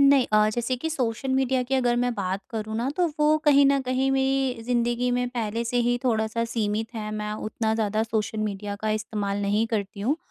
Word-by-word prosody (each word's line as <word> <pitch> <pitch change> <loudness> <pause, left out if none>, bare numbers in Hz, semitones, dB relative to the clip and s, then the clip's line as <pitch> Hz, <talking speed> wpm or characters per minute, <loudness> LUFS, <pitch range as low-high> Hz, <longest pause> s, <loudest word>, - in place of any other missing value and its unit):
नहीं 275 -2 +5
अ, 215 0 +5
जैसे 240 +3 -1
कि 285 +6 -3
सोशल 255 -2 -2
मीडिया 265 -1 +2
की 270 - +1
अगर 245 -2 +2
मैं 245 0 +1
बात 195 -1 -2
करूँ 220 -2 -4
ना, 235 +3 -1
तो 355 -1 +3
वो 300 +1 +4
कहीं 285 -2 +6
न 275 0 +3
कहीं 260 +1 0
मेरी 265 -3 +1
ज़िंदगी 240 +1 0
में 245 0 0
पहले 230 -2 -2
से 235 +1 -2
ही 245 0 +2
थोड़ा-सा 225 -1 +1
सीमित 225 0 -2
है। 215 -1 -4
मैं 210 0 -3 0.2
उतना 220 0 -1
ज़्यादा 215 -1 0
सोशल 220 -1 -2
मीडिया 205 -1 -3
का 215 - 0
इस्तेमाल 210 -2 -3
नहीं 205 +3 +1
करती 205 -3 -3
हूँ। 260 +9 +1
230 Hz, 210 wpm, -25 LUFS, 215-255 Hz, 0.2 s, कहीं